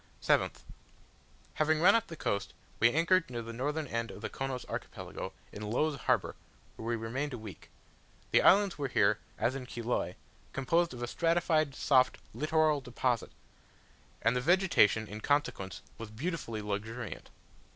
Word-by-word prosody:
7th. - - +1 0.9
Having 155 0 +2
run 185 +5 +7
up 230 - +2
the 165 - -7
coast, 100 -9 -2 0.2
we 115 +1 +6
anchored 170 +3 +3
near 120 -2 -4
the 115 +1 -7
northern 145 +6 -2
end 115 -3 -2
of 105 - -9
the - - -4
Chonos 135 -2 -4
Archipelago, - - -6 0.2
in 105 - -8
Low's 150 +6 +1
Harbour, 130 - +1 0.4
where 110 - -7
we 120 - +1
remained 125 +6 -3
a - - -4
week. 110 -3 -10 0.6
The - - +5
islands 200 -4 +5
were 140 - 0
here, 105 -4 +3 0.2
as 125 - +1
in 130 -2 -6
Chiloe, 120 -7 -2 0.4
composed 165 +3 +1
of 120 - -6
a - - -2
stratified, 165 -2 +1
soft, 130 -2 +3 0.2
littoral 155 -1 +2
deposit; 125 -1 -1 0.9
and 115 +3 +3
the 125 - +1
vegetation 170 - +4
in 105 +1 -7
consequence 145 -10 -1 0.2
was 115 -1 -6
beautifully 115 -3 -4
luxuriant. 110 +3 -5
130 Hz, 155 wpm, -31 LUFS, 115-155 Hz, 0.9 s, run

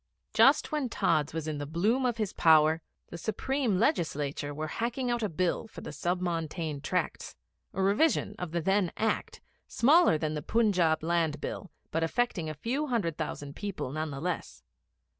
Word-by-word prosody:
Just - - +5
when 295 -5 -1
Tods 150 -9 +1
was 160 -1 -4
in 150 -2 -3
the 145 - -4
bloom 215 - +1
of 240 -2 -1
his 215 -4 -2
power, 160 0 +5 0.3
the 170 - -8
Supreme 230 - -1
Legislature 150 - 0
were 155 +2 -4
hacking 240 - -2
out 240 -1 0
a 215 - 0
Bill 180 +6 -1
for - - -11
the - - -7
Sub 180 +1 -1
Montane 165 -4 -3
Tracts, - - -2 0.4
a 190 - -1
revision 210 +3 +2
of 180 - -4
the 170 0 -1
then 195 +1 +2
Act, 220 - -1 0.3
smaller 295 - +5
than 155 0 -2
the 150 - -3
Punjab 180 -9 +2
Land 165 -3 +1
Bill, 190 - -5 0.2
but 165 - 0
affecting 175 -3 0
a 155 - -5
few 260 - -2
hundred 205 - 0
thousand 145 -2 -5
people 200 -10 -4
none 155 +2 -3
the 140 -1 -6
less. 175 +3 -4
175 Hz, 180 wpm, -29 LUFS, 155-225 Hz, 0.4 s, Just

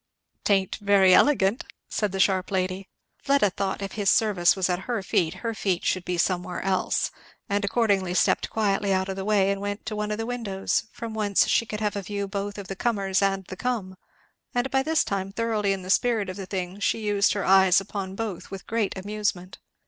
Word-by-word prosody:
"'Tain't 195 -2 +2
very 200 -2 +5
elegant," 230 -6 +4 0.2
said 210 -3 -1
the 195 - -4
sharp 190 -1 +2
lady. 185 0 -2 0.3
Fleda 275 -8 +3
thought 195 +1 -3
if 195 - -4
his 205 -3 0
service 200 -6 +3
was 190 -2 0
at 180 -1 0
her 230 -5 -1
feet, 170 -2 0
her 230 - 0
feet 190 -5 -1
should 185 - 0
be 180 -1 -2
somewhere 180 0 -1
else, 190 -1 0 0.4
and 205 0 0
accordingly 200 -4 +1
stepped - - +2
quietly 200 -2 0
out 190 0 +1
of 190 - -3
the 190 - -4
way 200 -1 +3
and 200 0 -3
went 205 0 -4
to 220 -1 -4
one 210 0 -2
of 210 - -2
the 225 - -3
windows, 225 -6 -2
from 230 -2 -7
whence 210 -2 +2
she 230 - +2
could 210 0 -5
have 210 -1 -1
a 200 - -2
view 200 +1 -4
both 200 +1 -4
of 200 -2 -7
the 195 - -5
comers 195 -3 0
and 195 -1 0
the 185 - -8
come; 215 -5 -3 0.6
and 245 +2 0
by 265 - +3
this 315 +3 +2
time 195 -1 -3
thoroughly 215 -2 0
in 195 -1 -2
the 185 - -3
spirit 225 -3 +2
of 185 - -5
the 195 -2 -7
thing 185 0 -4
she 200 - +1
used 205 -2 +2
her 205 - -2
eyes 190 -1 +6
upon 195 -1 -5
both 210 -5 -5
with 195 -1 -8
great 220 -3 -1
amusement. 200 -2 -3
200 Hz, 215 wpm, -25 LUFS, 190-210 Hz, 0.6 s, eyes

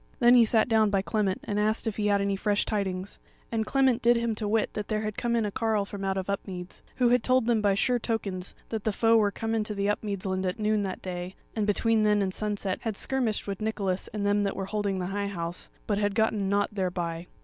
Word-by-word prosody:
Then 240 0 +6
he 245 -2 +8
sat 220 0 +3
down 220 -2 +4
by 195 -1 +1
Clement 200 -3 0
and 205 0 -2
asked 215 +1 +1
if 220 -3 -2
he 210 -1 +1
had 200 -1 +3
any 200 0 0
fresh 205 +1 0
tidings; 195 -2 -3 0.3
and 220 -2 -1
Clement 265 -3 +3
did 240 +1 +5
him 235 -1 0
to 215 -1 -3
wit 220 +1 +1
that 210 -1 -4
there 215 -1 -1
had 215 -1 -3
come 235 -1 0
in 230 -2 +1
a 205 - -2
carle 220 -1 0
from 200 0 -7
out 195 0 0
of 190 - -3
Upmeads, 190 -2 -5
who 245 -2 +3
had 245 0 +4
told 255 -2 +3
them 230 -2 +2
by 200 -2 +3
sure 245 +4 +2
tokens 200 -5 -3
that 220 -2 -3
the 220 - 0
foe 225 +2 +4
were 210 -2 +4
come 225 +2 -3
into 215 -1 -1
the 200 0 0
Upmeads 205 -2 -2
land 190 0 -1
at 180 - -2
noon 215 -1 +1
that 190 -2 -4
day, 180 0 -5 0.2
and 215 -2 0
between 225 +2 +2
then 210 -1 +3
and 190 -1 -2
sunset 205 -2 -2
had 220 -3 -3
skirmished 250 -6 -1
with 200 0 -5
Nicholas 200 -4 -1
and 205 -1 -4
them 205 0 +3
that 200 -1 -1
were 195 - -3
holding 200 -1 -1
the 180 - -2
High 200 0 -1
House, 175 -3 -4 0.2
but 205 -1 0
had 205 -1 0
gotten 220 -3 +1
nought 205 +1 +1
thereby. 175 -3 -2
210 Hz, 250 wpm, -28 LUFS, 195-220 Hz, 0.3 s, he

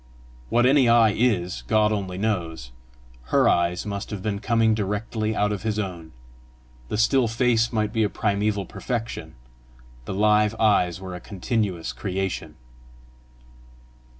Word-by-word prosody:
What 120 +1 +3
any 130 -2 +5
eye 115 -2 +5
IS, 100 -6 0
God 110 -1 +3
only 95 -3 -3
knows: 85 - -2 0.5
her - - +3
eyes 85 +1 +1
must 100 -1 -5
have 100 -3 -6
been 105 -2 -2
coming 115 0 +2
direct 105 +1 -3
out 110 -1 0
of 105 - -3
his 110 -1 -2
own! 90 -6 -5 0.8
the - - -2
still 125 +2 +3
face 115 0 +1
might 110 -1 -1
be 110 - +1
a 105 - +2
primeval 100 -1 -1
perfection; 115 +4 -5 0.7
the - - -4
live 105 +1 +3
eyes 95 -5 +2
were 95 -1 -7
a 90 - -6
continuous 95 - -2
creation. 90 +3 -4
105 Hz, 140 wpm, -24 LUFS, 95-110 Hz, 0.8 s, any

